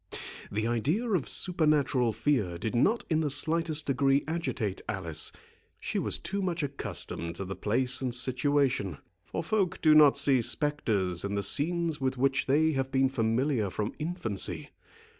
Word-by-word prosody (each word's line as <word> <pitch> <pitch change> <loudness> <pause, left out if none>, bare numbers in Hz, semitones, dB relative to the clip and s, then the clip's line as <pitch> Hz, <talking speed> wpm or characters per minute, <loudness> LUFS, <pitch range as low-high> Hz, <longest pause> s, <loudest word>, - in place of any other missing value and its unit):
The 110 +2 -1
idea 140 - 0
of 155 - 0
supernatural 150 -8 +1
fear 110 -10 0
did 110 +5 -3
not 205 - +2
in 160 -2 +1
the 150 - 0
slightest 155 +2 +1
degree 135 +1 +2
agitate 130 - -3
Alice. 85 -7 +1 0.5
She - - -2
was - - 0
too 195 +4 -4
much 180 -3 -2
accustomed 110 -11 -2
to 95 - -5
the 95 +1 -5
place 125 +7 0
and 125 -2 -2
situation; 130 - 0 0.3
for - - -4
folk 195 -5 0
do 155 -1 +5
not 150 -2 +7
see 140 -3 +3
spectres 115 - -1
in 100 0 -2
the 100 - 0
scenes 165 - 0
with 130 0 -1
which 135 0 +1
they 155 +4 +3
have 135 -2 -1
been 135 -1 +3
familiar 115 -1 0
from 105 +3 -3
infancy. 155 - -3
135 Hz, 160 wpm, -29 LUFS, 110-155 Hz, 0.5 s, not